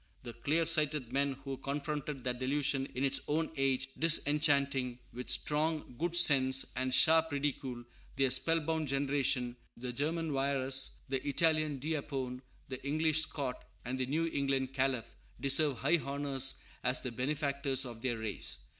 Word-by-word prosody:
The 120 Hz, -2 st, -7 dB
clear 150 Hz, +8 st, 0 dB
sighted 150 Hz, -6 st, 0 dB
men 140 Hz, 0 st, +1 dB
who 135 Hz, -1 st, -5 dB
confronted 145 Hz, -1 st, -4 dB
that 125 Hz, -1 st, -2 dB
delusion 135 Hz, 0 st, 0 dB
in 130 Hz, -, -2 dB
its 135 Hz, -, +2 dB
own 160 Hz, +2 st, -1 dB
age, 135 Hz, -1 st, +1 dB
disenchanting, 145 Hz, -5 st, +2 dB, 0.2 s
with 125 Hz, +1 st, -7 dB
strong 155 Hz, -2 st, +2 dB
good 175 Hz, 0 st, -1 dB
sense 135 Hz, -6 st, +6 dB
and 130 Hz, 0 st, -1 dB
sharp 160 Hz, +4 st, +4 dB
ridicule, 135 Hz, -3 st, -3 dB, 0.3 s
their 135 Hz, -1 st, +2 dB
spell 165 Hz, +4 st, +2 dB
bound 160 Hz, 0 st, -2 dB
generation, 135 Hz, -3 st, 0 dB, 0.2 s
the 125 Hz, +1 st, -5 dB
German 160 Hz, +4 st, -2 dB
Wierus, 135 Hz, -1 st, 0 dB
the 135 Hz, -1 st, -1 dB
Italian 155 Hz, -1 st, +2 dB
D'Apone, 135 Hz, -3 st, -4 dB, 0.3 s
the 130 Hz, 0 st, -7 dB
English 155 Hz, +2 st, +1 dB
Scot, 140 Hz, -5 st, -3 dB, 0.2 s
and 130 Hz, +2 st, -4 dB
the 130 Hz, -, -1 dB
New 160 Hz, +5 st, 0 dB
England 135 Hz, -1 st, -1 dB
Calef, 130 Hz, -3 st, 0 dB, 0.3 s
deserve 140 Hz, 0 st, +4 dB
high 170 Hz, -, +2 dB
honors 140 Hz, -2 st, 0 dB, 0.2 s
as 125 Hz, 0 st, +1 dB
the 125 Hz, -, -4 dB
benefactors 140 Hz, +1 st, -1 dB
of 120 Hz, -2 st, -9 dB
their 120 Hz, -2 st, -1 dB
race. 110 Hz, -4 st, -3 dB
140 Hz, 150 wpm, -32 LUFS, 130-150 Hz, 0.3 s, sense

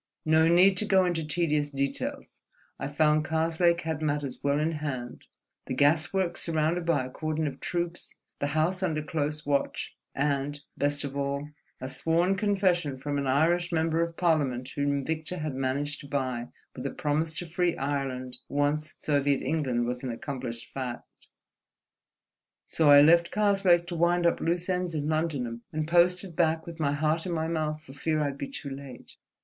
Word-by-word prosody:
No 160 Hz, +1 st, +5 dB
need 185 Hz, +3 st, +6 dB
to 215 Hz, -, +2 dB
go 190 Hz, -2 st, +4 dB
into 175 Hz, -3 st, 0 dB
tedious 150 Hz, -2 st, 0 dB
details; 140 Hz, -1 st, -3 dB, 0.4 s
I 135 Hz, -, -2 dB
found 150 Hz, +1 st, +3 dB
Karslake 165 Hz, +2 st, +2 dB
had 160 Hz, -1 st, -3 dB
matters 145 Hz, -3 st, -2 dB
well 140 Hz, +1 st, +2 dB
in 155 Hz, +2 st, +1 dB
hand: 140 Hz, -6 st, -5 dB, 0.4 s
the 130 Hz, -, -2 dB
gas 150 Hz, +3 st, +3 dB
works 185 Hz, -3 st, 0 dB
surrounded 165 Hz, +1 st, 0 dB
by 145 Hz, -6 st, +2 dB
a -, -, -7 dB
cordon 155 Hz, +2 st, -2 dB
of 140 Hz, -, -4 dB
troops, 175 Hz, -1 st, -3 dB, 0.2 s
the 145 Hz, -, 0 dB
house 180 Hz, +4 st, +1 dB
under 155 Hz, -5 st, 0 dB
close 150 Hz, 0 st, -2 dB
watch, 140 Hz, -1 st, -1 dB, 0.2 s
and—best 145 Hz, 0 st, -1 dB
of 140 Hz, -1 st, -5 dB
all—a 140 Hz, -1 st, -5 dB
sworn 165 Hz, +7 st, +1 dB
confession 190 Hz, -8 st, +1 dB
from 145 Hz, +2 st, -2 dB
an 140 Hz, -, -2 dB
Irish 170 Hz, +6 st, +2 dB
Member 165 Hz, 0 st, +1 dB
of 170 Hz, 0 st, -2 dB
Parliament 140 Hz, -7 st, +1 dB
whom 140 Hz, -1 st, -1 dB
Victor 160 Hz, +3 st, -3 dB
had 155 Hz, -3 st, -3 dB
managed 135 Hz, +2 st, -2 dB
to 140 Hz, -, -10 dB
buy 130 Hz, -4 st, -2 dB, 0.3 s
with -, -, -4 dB
a -, -, -2 dB
promise 155 Hz, +2 st, -1 dB
to 175 Hz, -, -4 dB
free 175 Hz, +1 st, 0 dB
Ireland 130 Hz, -3 st, -3 dB
once 145 Hz, +2 st, 0 dB
Soviet 140 Hz, -2 st, +1 dB
England 130 Hz, -7 st, 0 dB
was 125 Hz, +1 st, -3 dB
an 130 Hz, -, -3 dB
accomplished 120 Hz, -1 st, -6 dB
fact. 125 Hz, -3 st, -7 dB, 1.4 s
So 160 Hz, -2 st, +2 dB
I 145 Hz, 0 st, +10 dB
left 170 Hz, +3 st, +6 dB
Karslake 195 Hz, -4 st, +3 dB
to 175 Hz, -, -5 dB
wind 175 Hz, +1 st, +2 dB
up 170 Hz, -, +3 dB
loose 175 Hz, +1 st, 0 dB
ends 180 Hz, -2 st, -1 dB
in 150 Hz, -1 st, -1 dB
London, 145 Hz, -7 st, -1 dB
and 155 Hz, 0 st, -2 dB
posted 175 Hz, +1 st, +3 dB
back 160 Hz, -1 st, +2 dB
with 170 Hz, -1 st, -9 dB
my 145 Hz, -2 st, +1 dB
heart 155 Hz, +4 st, 0 dB
in -, -, -2 dB
my 160 Hz, -1 st, -1 dB
mouth 155 Hz, -2 st, -2 dB
for 135 Hz, -, -12 dB
fear 155 Hz, +2 st, -1 dB
I'd 140 Hz, -1 st, -3 dB
be -, -, -3 dB
too 150 Hz, -, -7 dB
late." 135 Hz, -2 st, -10 dB
155 Hz, 175 wpm, -28 LUFS, 140-170 Hz, 1.4 s, I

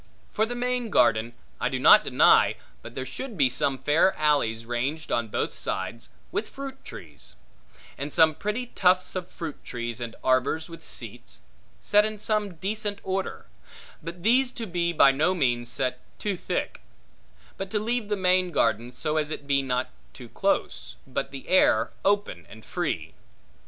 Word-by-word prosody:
For 220 Hz, +1 st, +1 dB
the 245 Hz, -, -4 dB
main 245 Hz, -1 st, -1 dB
garden, 115 Hz, -, +3 dB, 0.3 s
I -, -, 0 dB
do -, -, -2 dB
not -, -, +7 dB
deny, -, -, +5 dB, 0.3 s
but -, -, -11 dB
there 130 Hz, -, -4 dB
should 245 Hz, -, -6 dB
be 135 Hz, -4 st, +3 dB
some 135 Hz, +1 st, 0 dB
fair 150 Hz, +8 st, +3 dB
alleys 130 Hz, -7 st, +1 dB
ranged 135 Hz, +7 st, -3 dB
on 120 Hz, -1 st, +1 dB
both -, -, -2 dB
sides, 95 Hz, +5 st, -3 dB, 0.2 s
with 215 Hz, -, -2 dB
fruit 270 Hz, -1 st, -8 dB
trees; 70 Hz, -7 st, -11 dB, 0.6 s
and 140 Hz, +2 st, -4 dB
some 160 Hz, -1 st, +5 dB
pretty 210 Hz, +10 st, -3 dB
tufts 185 Hz, -6 st, +2 dB
of 180 Hz, -1 st, -4 dB
fruit 160 Hz, -4 st, -7 dB
trees, 120 Hz, 0 st, -4 dB
and 115 Hz, -1 st, -5 dB
arbors 130 Hz, +5 st, +1 dB
with 165 Hz, -, -11 dB
seats, -, -, -5 dB, 0.4 s
set 210 Hz, 0 st, +4 dB
in 215 Hz, 0 st, -2 dB
some 210 Hz, -3 st, -1 dB
decent 205 Hz, +4 st, -3 dB
order; 190 Hz, 0 st, -3 dB, 0.6 s
but 170 Hz, +2 st, -8 dB
these 250 Hz, +4 st, +4 dB
to 230 Hz, -, -5 dB
be 175 Hz, -3 st, -1 dB
by 145 Hz, -4 st, +6 dB
no 155 Hz, +7 st, +1 dB
means 120 Hz, -6 st, 0 dB
set 125 Hz, 0 st, 0 dB, 0.2 s
too 205 Hz, -2 st, -2 dB
thick; -, -, -3 dB, 0.7 s
but 195 Hz, 0 st, -5 dB
to 210 Hz, -, -1 dB
leave 230 Hz, +1 st, -1 dB
the 210 Hz, -, 0 dB
main 185 Hz, -1 st, +2 dB
garden 120 Hz, -7 st, +1 dB
so 155 Hz, +5 st, -2 dB
as 150 Hz, -1 st, 0 dB
it 150 Hz, -2 st, -5 dB
be 140 Hz, -1 st, +2 dB
not 130 Hz, -1 st, -2 dB, 0.4 s
close, -, -, -1 dB
but 135 Hz, +1 st, -3 dB
the 135 Hz, -1 st, -9 dB
air 120 Hz, -11 st, +4 dB
open 200 Hz, -, 0 dB
and 110 Hz, 0 st, -13 dB
free. -, -, -3 dB
160 Hz, 165 wpm, -26 LUFS, 125-205 Hz, 0.7 s, not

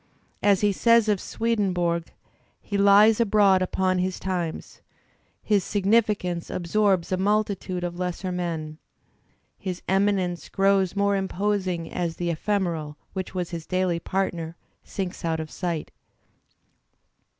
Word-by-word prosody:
As 200 Hz, -2 st, +3 dB
he 205 Hz, -1 st, +3 dB
says 230 Hz, +2 st, +4 dB
of 205 Hz, -3 st, +1 dB
Swedenborg, 180 Hz, -7 st, 0 dB, 0.5 s
he 205 Hz, -, -6 dB
Ues 200 Hz, +2 st, +6 dB
abroad 200 Hz, -4 st, +4 dB
upon 185 Hz, 0 st, +1 dB
his 185 Hz, 0 st, -1 dB
times; 175 Hz, -4 st, -4 dB, 0.6 s
his 205 Hz, -3 st, +2 dB
significance 200 Hz, -4 st, +1 dB
absorbs 190 Hz, 0 st, +1 dB
a 185 Hz, -, +1 dB
multitude 200 Hz, -2 st, 0 dB
of 175 Hz, 0 st, -4 dB
lesser 180 Hz, +1 st, -3 dB
men; 165 Hz, -3 st, -4 dB, 0.8 s
his 185 Hz, -2 st, -5 dB
eminence 190 Hz, -2 st, +1 dB
grows 195 Hz, -1 st, +2 dB
more 200 Hz, 0 st, +2 dB
imposing 190 Hz, -3 st, -1 dB
as 170 Hz, -2 st, -2 dB
the 175 Hz, -1 st, -2 dB
ephemeral 165 Hz, -4 st, -2 dB, 0.2 s
which 190 Hz, 0 st, -5 dB
was 180 Hz, -1 st, -2 dB
his 165 Hz, -2 st, -6 dB
daily 185 Hz, -2 st, 0 dB
partner 170 Hz, -3 st, -2 dB, 0.3 s
sinks 190 Hz, -3 st, -5 dB
out 165 Hz, -1 st, 0 dB
of 155 Hz, -1 st, -6 dB
sight. 170 Hz, -4 st, -3 dB
185 Hz, 125 wpm, -25 LUFS, 175-200 Hz, 0.8 s, Ues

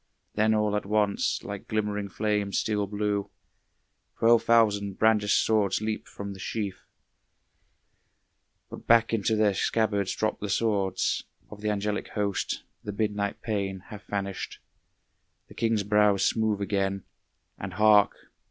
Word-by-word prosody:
Then 110 Hz, +1 st, +2 dB
all 105 Hz, -1 st, +1 dB
at 105 Hz, -, -2 dB
once, 105 Hz, -1 st, +1 dB
like -, -, -7 dB
glimmering 105 Hz, -2 st, -2 dB
flames 105 Hz, -1 st, -1 dB
steel 105 Hz, -2 st, 0 dB
blue, 105 Hz, 0 st, -2 dB, 0.9 s
Twelve 115 Hz, 0 st, +5 dB
thousand 105 Hz, -4 st, +3 dB
brandished 110 Hz, -2 st, +3 dB
swords 105 Hz, -3 st, +2 dB
leap 110 Hz, 0 st, -3 dB
from 100 Hz, 0 st, -7 dB
the 95 Hz, -, -12 dB
sheath. 100 Hz, 0 st, -4 dB, 1.9 s
But -, -, -10 dB
back 115 Hz, 0 st, +5 dB
into 110 Hz, 0 st, +1 dB
their 105 Hz, -2 st, +3 dB
scabbards 100 Hz, -1 st, 0 dB
drop 110 Hz, 0 st, -1 dB
the 105 Hz, -, -4 dB
swords 100 Hz, -3 st, 0 dB, 0.3 s
Of 105 Hz, -1 st, -10 dB
the 105 Hz, -, -1 dB
angelic 105 Hz, 0 st, -2 dB
host; 100 Hz, -2 st, -2 dB, 0.2 s
the 105 Hz, -, -4 dB
midnight 105 Hz, -1 st, -2 dB
pain 100 Hz, -4 st, -2 dB
Hath 105 Hz, -2 st, -10 dB
vanished, 100 Hz, -1 st, -4 dB, 0.9 s
the -, -, -14 dB
king's 115 Hz, -2 st, 0 dB
brow 105 Hz, 0 st, +4 dB
is 95 Hz, -, +1 dB
smooth 110 Hz, -2 st, +1 dB
again; 100 Hz, -1 st, -1 dB, 0.6 s
And 95 Hz, -1 st, -6 dB
hark! 105 Hz, 0 st, +5 dB
105 Hz, 135 wpm, -27 LUFS, 100-110 Hz, 1.9 s, Twelve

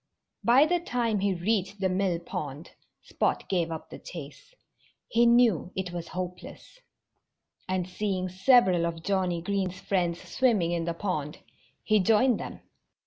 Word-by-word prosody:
By 255 Hz, +5 st, +6 dB
the 350 Hz, +2 st, +1 dB
time 240 Hz, -, -1 dB
he 195 Hz, -1 st, +1 dB
reached 195 Hz, +2 st, -1 dB
the 190 Hz, -, +1 dB
mill 185 Hz, -1 st, 0 dB
pond 155 Hz, -2 st, -6 dB, 0.3 s
Spot -, -, -1 dB
gave 170 Hz, -3 st, 0 dB
up 160 Hz, -, -7 dB
the -, -, -8 dB
chase. 165 Hz, -, -10 dB, 0.5 s
He 235 Hz, +1 st, +3 dB
knew 235 Hz, -7 st, +4 dB
it 185 Hz, -2 st, -3 dB
was 175 Hz, -1 st, -5 dB
hopeless. 180 Hz, -, -7 dB, 0.9 s
And 185 Hz, -1 st, -1 dB
seeing 185 Hz, -1 st, -2 dB
several 185 Hz, -3 st, +4 dB
of 165 Hz, -1 st, -6 dB
Johnnie 185 Hz, -3 st, 0 dB
Green's 190 Hz, -1 st, -2 dB
friends 175 Hz, -4 st, -1 dB
swimming 215 Hz, -10 st, +1 dB
in 170 Hz, -1 st, -1 dB
the 170 Hz, -1 st, -2 dB
pond, 155 Hz, -6 st, -3 dB, 0.4 s
he 215 Hz, -1 st, +3 dB
joined 225 Hz, +5 st, +3 dB
them. -, -, -7 dB
185 Hz, 145 wpm, -28 LUFS, 175-215 Hz, 0.9 s, By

